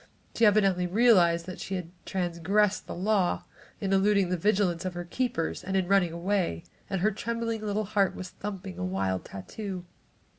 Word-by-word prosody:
She 230 - +5
evidently 195 -4 +3
realized 180 -5 +4
that 185 0 -7
she 195 - -4
had 175 -2 -5 0.2
transgressed 190 +3 +1
the - - -5
law 190 0 +1 0.4
in 195 -1 -1
eluding 195 -1 +3
the 180 - +1
vigilance 185 -2 +1
of 185 -1 -4
her 175 0 -4
keepers, 225 -3 -2
and 190 +1 -1
in 185 -2 +1
running 190 -3 +3
away, 170 - -1 0.3
and 195 -3 -1
her 215 +3 +3
trembling 230 +1 -3
little 210 0 -1
heart 200 -2 +1
was 185 - -6
thumping 190 - -6
a - - -2
wild 95 0 -1
tattoo. 180 - -6
190 Hz, 175 wpm, -28 LUFS, 175-210 Hz, 0.4 s, She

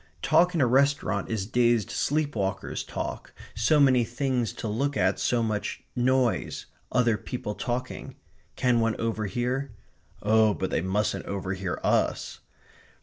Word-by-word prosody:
Talk 180 +1 +4
in 160 - +2
a - - +5
restaurant 130 -6 +2
is 110 -4 -1
dazed 120 -2 +2
sleep 145 -1 0
walkers' 100 -1 -2
talk, - - -5 0.2
so 120 +8 +3
many 130 -4 +5
things 125 -1 -1
to - - -5
look 135 +7 -1
at - - +2
so 120 -1 +1
much 110 -2 -3
noise 125 -1 +1 0.3
other 120 -3 +3
people 110 -1 -5
talking. 120 +3 -4 0.4
Can 125 -2 +2
one 115 -1 0
overhear? 115 +4 -2 0.5
Oh, 110 0 +4
but 95 - -3
they - - +1
mustn't 95 +4 -1
overhear 95 -1 -3
US. - - 0
115 Hz, 140 wpm, -27 LUFS, 105-130 Hz, 0.5 s, a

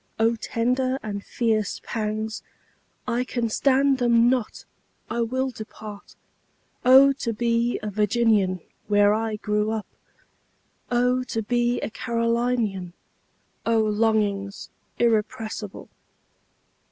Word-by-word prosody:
O 225 +1 +3
tender 250 +4 0
and 200 -2 -4
fierce 220 -3 -1
pangs—I 220 +2 -5
can 240 -2 -2
stand 270 +3 +3
them 240 0 +4
not—I 235 -1 -5
will 260 +3 -1
depart;O 230 +5 0
to 235 -4 -3
be 235 +1 0
a 210 - -3
Virginian, 210 -3 +2 0.3
where 205 0 +4
I 220 0 -1
grew 210 0 -1
up! 220 -2 -2 1.0
O 250 +1 +2
to 225 -3 -3
be 240 +2 +1
a - - -4
Carolinian!O 230 -2 -2
longings 210 -2 0 0.3
irrepressible! 220 -2 -1
225 Hz, 90 wpm, -24 LUFS, 210-240 Hz, 1.0 s, them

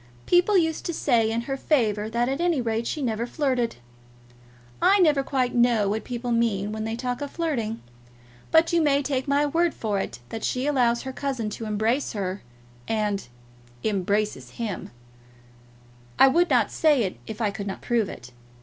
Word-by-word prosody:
People 360 +3 +4
used 320 -2 +1
to 340 - -2
say 235 -7 +2
in 225 +1 -1
her 270 +3 -3
favour 220 -7 +1
that 235 +2 0
at 270 +5 -1
any 345 -4 +2
rate 230 -1 -1
she 300 - -3
never 230 -1 -1
flirted. 255 -4 0 1.1
I 400 - +5
never 305 -7 +4
quite 260 -2 -1
know 235 -4 +3
what 215 +2 -2
people 245 0 -4
mean 215 -4 +1
when 220 0 -4
they 225 +1 -2
talk 245 +1 -3
of 285 - -3
flirting. 245 -11 -2 0.7
But 325 +1 +4
you 340 - +4
may 285 -2 +3
take 265 -1 -2
my 285 +1 +3
word 330 +3 +1
for 210 -3 -1
it - - -4
that 225 - -6
she 255 +1 -1
allows 245 -5 +2
her 265 -1 -5
cousin 255 -6 -3
to 225 - -6
embrace 220 +6 0
her, 195 -2 -3 0.5
and 210 - -1 0.6
embraces 205 +1 -1
him. 225 -4 -4 1.3
I 270 - +7
would 345 +6 +3
not - - +3
say 295 -6 +3
it 190 - -3
if 220 0 -7
I 215 -3 +1
could 200 0 -6
not 195 - -6
prove 230 -4 +1
it. 120 +1 -10
240 Hz, 180 wpm, -25 LUFS, 220-285 Hz, 1.3 s, I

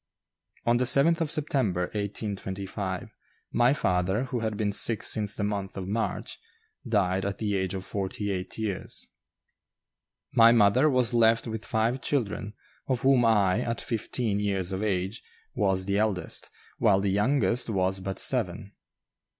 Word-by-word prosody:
On 120 0 +3
the 125 - +1
7th 160 +6 +5
of 160 - 0
September, 130 - 0
1825, 100 -2 -4 0.4
my 120 +2 +3
father, 95 -4 0
who 125 -2 -3
had 110 -2 -3
been 105 -1 0
sick 110 +2 +4
since 105 -2 +3
the 100 - -3
month 100 -2 -3
of 95 -1 -5
March, 115 +3 -3 0.5
died 95 -3 +1
at 100 0 -3
the 105 -2 -1
age 95 0 -2
of 95 0 -6
forty 100 +1 -3
eight 95 -1 -5
years. 105 -4 -4 1.3
My 115 0 +7
mother 120 +6 +4
was 125 -3 +3
left 115 -1 +3
with 110 -2 -5
five 115 +4 -1
children, 105 -6 -2 0.3
of 130 -2 -1
whom 130 -2 +4
I, 105 -3 +3
at 115 -1 -3
fifteen 115 -2 -2
years 100 -3 -1
of 95 +1 -3
age, 100 +1 -2 0.3
was 95 -4 0
the 100 +1 0
eldest, 100 -6 -2 0.3
while 100 -2 +4
the 100 0 0
youngest 115 +2 +1
was 95 -2 0
but 95 0 -5
seven. 105 -5 -1
105 Hz, 150 wpm, -27 LUFS, 95-115 Hz, 1.3 s, My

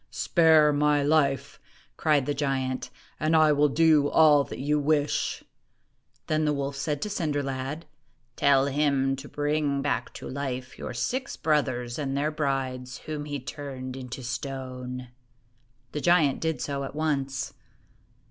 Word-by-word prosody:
"Spare 160 -3 +4
my 145 0 +3
life," 140 -2 +1 0.4
cried 150 -4 +2
the 145 - 0
giant, 135 -3 -2 0.3
"and 155 +1 +2
I 155 -1 +6
will 150 0 +3
do 155 -1 +4
all 150 -3 +6
that - - -8
you 150 +3 +1
wish! 145 0 0 0.4
" - - -42
Then 155 0 +1
the 150 -1 +2
wolf 140 0 -3
said 145 +1 -2
to 210 - -3
Cinder 150 -7 -1
lad, 135 +4 -4 0.3
" 125 -2 -43
Tell 135 -1 +4
him 140 -1 +1
to 140 +2 -9
bring 145 -1 0
back 130 -5 -1
to - - -7
life 130 -1 -4
your - - -5
six 255 - -2
brothers 130 -5 0
and 140 -2 -2
their 150 +2 0
brides, 135 -4 -2
whom 150 -1 -4
he 145 -1 -4
turned 130 -1 -7
into 130 -1 -7
stone." 125 0 -5 0.8
The 150 - -4
giant 165 -5 +3
did 160 -1 -1
so 140 -1 -2
at 135 - -7
once. 140 -4 -1
140 Hz, 155 wpm, -27 LUFS, 135-150 Hz, 0.8 s, I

